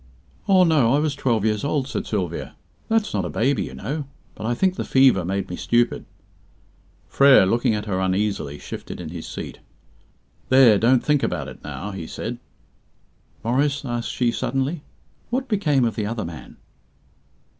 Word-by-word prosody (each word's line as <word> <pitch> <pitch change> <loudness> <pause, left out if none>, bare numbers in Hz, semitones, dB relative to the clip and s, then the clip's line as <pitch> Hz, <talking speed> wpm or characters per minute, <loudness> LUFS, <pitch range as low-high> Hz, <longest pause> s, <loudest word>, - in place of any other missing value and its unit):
"Oh, 190 -2 +6
no; 145 -8 +4
I - - +3
was 150 -1 0
twelve 120 -6 0
years 105 -1 0
old," 145 -2 0
said - - -4
Sylvia; 90 -6 -3 0.3
"that's 225 -1 +1
not 100 -3 0
a 90 - -3
baby, 125 - 0
you - - -9
know. 145 0 -4 0.3
But 110 - -6
I 120 - 0
think 185 +8 +2
the - - -3
fever 130 -8 +4
made 95 +2 -2
me 90 - -5
stupid." 120 +5 +1 1.0
Frere, 140 -7 +6
looking 115 +2 +1
at 105 0 -4
her 95 -3 -1
uneasily, 95 -6 -1
shifted - - -8
in 85 -3 -6
his 85 -1 -7
seat. - - -7 0.9
"There, 125 -6 +6
don't 120 +2 +3
think 150 -2 +2
about - - -2
it - - -13
now," 105 +2 -6
he 90 -5 -6
said. - - -5 1.0
"Maurice," 140 +4 0
asked 120 -2 -3
she 120 -2 0
suddenly, 135 +7 -2 0.5
"what 260 +3 -1
became 155 - +2
of 115 - -1
the 105 -3 -2
other 110 0 -3
man?" 80 -2 -10
120 Hz, 170 wpm, -23 LUFS, 100-140 Hz, 1.0 s, Oh